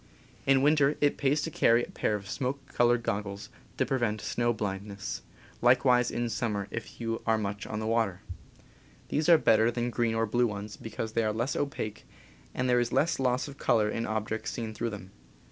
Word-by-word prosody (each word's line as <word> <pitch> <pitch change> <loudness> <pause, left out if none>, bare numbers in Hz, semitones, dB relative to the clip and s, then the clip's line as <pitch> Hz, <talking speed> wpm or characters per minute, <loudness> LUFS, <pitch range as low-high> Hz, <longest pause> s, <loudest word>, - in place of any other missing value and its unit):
In 135 0 +5
winter 145 -1 +4
it 145 -1 +3
pays 145 +2 +1
to 165 - -3
carry 120 -4 +4
a - - -7
pair 105 - 0
of 100 -1 -6
smoke 135 +5 -4
colored 120 0 +3
goggles, 100 -1 -3 0.3
to - - +2
prevent 120 -5 0
snow 120 +2 0
blindness 100 -2 -4 0.2
— - - -25
likewise 125 0 +4
in 120 0 -2
sum 115 0 -1
mer 100 -1 -3
if 115 -1 -7
you 115 -1 -2
are 110 0 +4
much 100 -1 -4
on 105 - -4
the 110 - -3
water. 110 -5 0 0.4
^^ - - -25
* - - -28
These 155 +3 +1
are 170 - +9
better 110 -4 +4
than 120 0 -2
green 115 -1 0
or 115 0 +2
blue 120 +3 +2
ones, 105 -1 -6
because 110 0 -5
they 115 - +2
are 110 - +1
less 120 +5 -1
opaque 140 -7 -3 0.5
and 130 - -1
there 125 -1 +4
is 120 -1 0
less 160 0 +2
loss 125 0 +1
of 140 -1 -11
color 105 -2 +2
in 115 - -2
objects 110 0 -2
seen 115 -2 -4
through 115 +2 -2
them. 100 -3 -9
115 Hz, 215 wpm, -29 LUFS, 105-125 Hz, 0.5 s, are